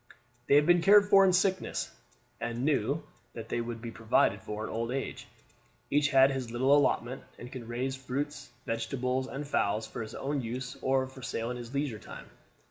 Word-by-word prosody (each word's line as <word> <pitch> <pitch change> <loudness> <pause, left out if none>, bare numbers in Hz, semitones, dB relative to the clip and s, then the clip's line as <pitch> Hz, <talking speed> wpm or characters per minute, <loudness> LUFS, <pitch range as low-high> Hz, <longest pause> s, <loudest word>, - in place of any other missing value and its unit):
They - - +5
had 145 +1 +6
been 175 +1 +5
cared 205 +3 +7
for 195 -1 +8
in 190 - +5
sickness, 185 +1 0 0.5
and 120 +2 -3
knew 150 0 +1 0.3
that 115 -1 -8
they 120 - -1
would 115 0 -6
be 115 - -5
provided 110 -2 +2
for 105 0 -5
in - - -4
old 115 +1 -2
age. 135 +2 -4 0.6
Each 145 0 +3
had 135 -1 +6
his 130 -3 -3
little 130 +4 +3
allotment, 130 -3 +1 0.2
and 125 +1 -9
could 120 -3 -8
raise 130 +3 -2
fruit, 135 +3 -3 0.3
vegetables, 125 +3 -1
and 140 +2 -6
fowls 110 -5 0
for - - -6
his 110 0 -7
own 140 +1 -2
use 125 +2 -5
or 130 0 +2
for 130 0 -12
sale 115 0 -3
in 125 - -4
his 120 +2 -8
leisure 140 -6 -1
time. - - -10
130 Hz, 195 wpm, -30 LUFS, 115-140 Hz, 0.6 s, for